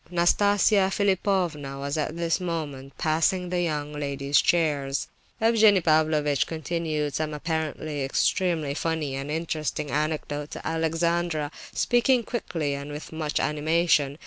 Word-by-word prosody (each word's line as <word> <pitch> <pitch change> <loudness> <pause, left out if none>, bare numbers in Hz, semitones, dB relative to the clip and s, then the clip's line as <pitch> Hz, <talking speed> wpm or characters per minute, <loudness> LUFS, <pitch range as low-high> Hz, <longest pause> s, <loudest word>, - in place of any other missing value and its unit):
Nastasia 195 +3 +3
Philipovna 185 -8 0
was 140 +1 -3
at 155 +1 -2
this 170 0 0
moment 150 -6 -5
passing 170 +3 +1
the 180 0 0
young 150 -3 -2
ladies' 140 -1 +1
chairs. 145 -5 +1 0.3
Evgenie 220 -3 +5
Pavlovitch 155 -3 +2
continued 160 -2 -2
some 155 +1 -2
apparently 155 -2 -3
extremely 155 +2 +1
funny 160 -2 -2
and 135 +2 -4
interesting 155 -2 -2
anecdote 150 -1 -2
to - - -7
Alexandra, 165 -1 0 0.2
speaking 245 0 +3
quickly 165 -11 -3
and 140 +1 -6
with 150 +1 -7
much 155 -2 -2
animation. 150 -1 +1
155 Hz, 120 wpm, -26 LUFS, 145-175 Hz, 0.3 s, Evgenie